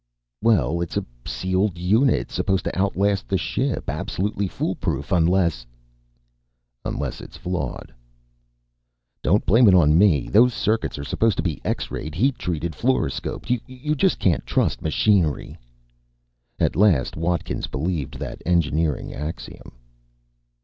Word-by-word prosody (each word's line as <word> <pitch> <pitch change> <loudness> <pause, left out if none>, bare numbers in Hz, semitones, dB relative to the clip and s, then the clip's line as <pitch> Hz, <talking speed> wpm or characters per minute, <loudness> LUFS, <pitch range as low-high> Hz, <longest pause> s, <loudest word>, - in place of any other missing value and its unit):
"Well, 85 - +2
it's 85 - -3
a - - -1 0.2
sealed 95 0 -1
unit. 100 - +2
Supposed 95 -1 0
to - - -3
outlast 100 +1 +1
the 95 - +1
ship. 120 - -2
Absolutely 100 +1 -2
foolproof, 85 -6 -3
unless 85 -6 +2 0.6
" - - -49
"Unless - - -4
it's - - -11
flawed." 75 -9 -4 1.3
"Don't 100 +6 +2
blame 115 +4 +5
it 95 - +7
on 80 -2 +5
me! 85 -11 +4
Those 120 +3 +4
circuits 110 -6 0
are 70 - -5
supposed 110 +8 +1
to - - 0
be 80 -6 -2
X - - -2
rayed, 80 +1 -5
heat 130 +9 +1
treated, 85 -1 -3
fluoroscoped 125 - -1
you 130 +4 -3
just 185 +5 +2
can't 90 -5 +1
trust - - 0
machinery!" 80 -1 +1 1.0
At - - +1
last 95 -10 +3
Watkins 85 +1 -2
believed 75 +1 -3
that - - -6
engineering 80 -3 0
axiom. 75 +3 -7
90 Hz, 130 wpm, -23 LUFS, 75-105 Hz, 1.3 s, it